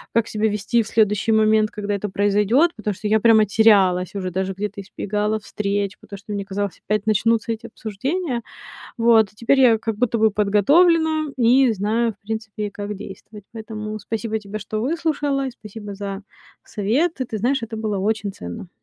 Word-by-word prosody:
как 230 -1 +3
себя 215 0 0
вести 210 +3 +1
в 220 - -6
следующий 210 0 +2
момент, 215 0 +3
когда 205 -1 -4
это 205 +1 -3
произойдет. 205 - +2
Потому 210 -2 -3
что 210 - -4
я 220 +1 +3
прямо 220 -1 +5
терялась 195 -3 +3
уже, 185 -2 -3
даже 190 +2 -2
где-то 205 +1 -5
избегала 210 +2 -2
встреч, 200 -1 -2
потому 200 - -10
что 205 +2 -8
мне 200 -1 -2
казалось: 200 0 -4
опять 210 0 0
начнутся 220 +1 +1
эти 225 +1 -5
обсуждения. 245 - -3 0.6
Вот, 230 -3 +4
теперь 235 +5 +2
я 235 -4 +6
как 225 -1 -3
будто 235 0 0
бы 220 0 +4
подготовлена 310 - +3
и 250 +1 +4
знаю, 220 +3 0
в - - -60
принципе, 220 -1 -4
как 205 +1 -5
действовать. 200 +2 -10
Поэтому 215 -1 -6
спасибо 220 +1 -3
тебе, 215 0 -7
что 215 +2 -4
выслушала, 285 0 -1
и - - -6
спасибо 210 -3 -9
за 200 0 -5 0.4
совет. 265 - -1
И 255 - +1
ты 220 -2 -5
знаешь, 250 +4 0
это 225 0 -7
было 215 -2 -2
очень 210 +1 -1
ценно. 90 - -8
215 Hz, 180 wpm, -21 LUFS, 205-230 Hz, 0.6 s, я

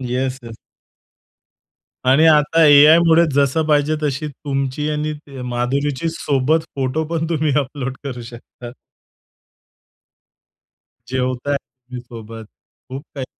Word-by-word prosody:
Yes, 130 +1 -2
yes. 115 -1 -10 1.6
आणि 155 +4 +5
आता 155 +1 +4
एआयमुळे 160 +3 +6
जसं 140 +3 +2
पाहिजे 150 0 +2
तशी 150 0 -2
तुमची 140 0 -3
आणि 150 0 -2
ती, 140 -3 -11
माधुरीची 130 +5 -2
सोबत 150 +1 0
फोटो 135 +3 -1
पण 165 0 -2
तुम्ही 155 -2 0
अपलोड 135 -1 -5
करू 125 -3 -6
शकतात. 120 +1 -11 2.4
जेवताय 130 +2 -1
तुम्ही 125 -2 -12
सोबत, 115 -2 -10 0.4
खूप 135 +3 -7
काही 135 -2 -4
140 Hz, 110 wpm, -19 LUFS, 125-150 Hz, 2.4 s, एआयमुळे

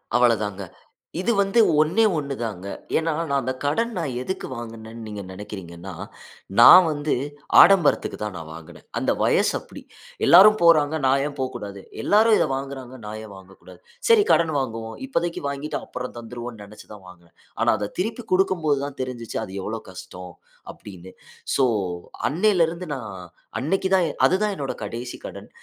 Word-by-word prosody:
அவ்வளதாங்க. 110 -5 +2 0.6
இது 190 +6 +1
வந்து 200 +3 +2 0.2
ஒண்ணே 160 +9 +2
1 140 -3 -3
தாங்க. 100 -4 -5 0.3
ஏனா, 165 0 0
நான் 165 -3 -3
அந்த 130 - -2
கடன், 230 +12 0
நான் 160 -6 -2
எதுக்கு 190 +7 -4
வாங்குனேனு 115 -1 -9
நீங்க 105 -2 -6
நெனைக்குறீங்கனா, 95 -2 -9 0.7
நான் 180 +9 +10
வந்து 145 -1 -1 0.5
ஆடம்பரத்துக்கு 195 -6 +4
தான் 105 -3 -4
நான் 80 -1 -9
வாங்குனேன். 80 -1 -13
அந்த - - +1
வயசு - - +2
அப்படி. - - -13 0.4
எல்லாரும் 210 +5 +8
போறாங்க. 160 -2 +4
நான் 135 +1 +3
ஏன் 145 - -8
போக்கூடாது? 105 -6 -5 0.2
எல்லாரும் 220 +1 +5
இத - - +2
வாங்குறாங்க. 135 -2 -7
நான் 105 +1 -6
ஏன் 105 -2 -11
வாங்கக்கூடாது? 95 0 -16 0.3
சரி, 450 -2 +6
கடன் 165 -2 +3
வாங்குவோம். 115 -3 -5
இப்போதைக்கு 175 -10 -2
வாங்கிட்டு, 140 +2 -4
அப்புறம் 125 0 -6
தந்துருவோனு, 120 -1 -8
நெனச்சு 105 +1 -14
தான் 100 -3 -14
வாங்குனேன். 85 -2 -17 0.3
ஆனா, - - +3
அத 105 0 -3
திருப்பி 225 +5 -3
குடுக்கும்போது 170 -6 +2
தான் 140 -1 -8
தெருஞ்சுச்சு, 125 -3 -5
அது 95 - -11
எவ்வளவு 110 +1 -6
கஷ்டம், 90 0 -10 0.4
அப்படினு. 95 -2 -12 0.4
சோ 135 - +3 0.7
அன்னைல 180 +2 +3
இருந்து 170 +2 -7
நான், 110 -7 -7 0.5
அன்னைக்கு 190 +7 0
தான் 185 -2 +3
எ - - -3 0.2
அதுதான் 205 +2 0
என்னோட 140 -2 -3
கடைசி 120 +4 -6
கடன். - - -10
130 Hz, 155 wpm, -23 LUFS, 105-170 Hz, 0.7 s, நான்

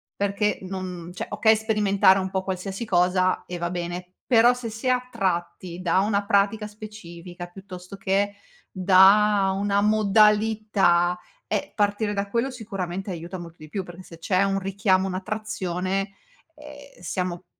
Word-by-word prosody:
perché 200 +1 0
non 185 -2 -6
cioè - - -5
okay 220 +2 +4
sperimentare 210 -3 +3
un 190 0 -3
po' 190 0 -2
qualsiasi 190 +3 -4
cosa, 185 -1 +1
e 180 - -6
va 175 0 -2
bene, 180 +1 -5
però 240 0 +5
se 245 -2 -6
si 220 +4 -6
è 255 - +4 0.2
tratti 175 -1 -3
da 180 +1 +2
una 200 0 0
pratica 200 +2 +1
specifica, 180 -5 -10
piuttosto 185 0 -11
che 200 +1 0 0.4
da 195 +1 +5
una 200 0 +1
modalità, 210 -4 +3 0.3
ehm, - - -2
partire 205 0 0
da 200 0 -3
quello 235 +5 0
sicuramente 195 -5 -5
aiuta 175 +2 -6
molto 170 -1 -10
di 155 - -12
più 195 +4 -3
perché 175 +1 -11
se 165 - -13
c'è 185 +3 +1
un 195 0 0
richiamo, 195 0 +1
un'attrazione, 190 -1 -3 0.5
ehm, 290 -6 -13
siamo 180 0 -4
195 Hz, 145 wpm, -24 LUFS, 180-210 Hz, 0.5 s, però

